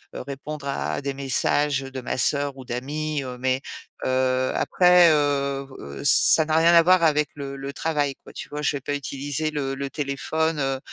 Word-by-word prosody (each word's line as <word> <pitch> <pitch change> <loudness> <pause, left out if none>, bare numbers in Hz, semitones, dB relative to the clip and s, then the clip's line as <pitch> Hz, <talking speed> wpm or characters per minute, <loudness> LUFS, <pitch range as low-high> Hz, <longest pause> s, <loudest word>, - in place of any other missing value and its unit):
heu, - - -5
répondre 140 +2 -7
à 140 +1 -3
des 140 0 -3
messages, 140 +1 +1
heu, 135 - -9
de 130 - -6
ma 130 - -4
sœur 140 +1 +1
ou 130 - -10
d'amis, 145 +5 -3
heu, 125 -1 -7
mais 130 +1 0 0.5
heu, 130 0 +1
après, 180 -2 +5
heu, 140 -2 0
b 135 - -16
heu, 70 -1 -8
ça 160 - +6
n'a 155 0 0
rien 165 +1 +5
à 170 - +8
voir 180 -1 +4
avec 150 -2 +3
le 140 -1 -7
le 140 +1 -6
travail 145 -1 -1
quoi. - - -13
Tu - - -8
vois? 150 0 -6
Je 145 -1 0
vais - - -10
pas 145 - -4
utiliser 145 +2 -3
le 135 -2 -3
le 140 0 -4
téléphone, 155 +2 -2
heu, 135 -1 -1
140 Hz, 210 wpm, -23 LUFS, 135-150 Hz, 0.5 s, à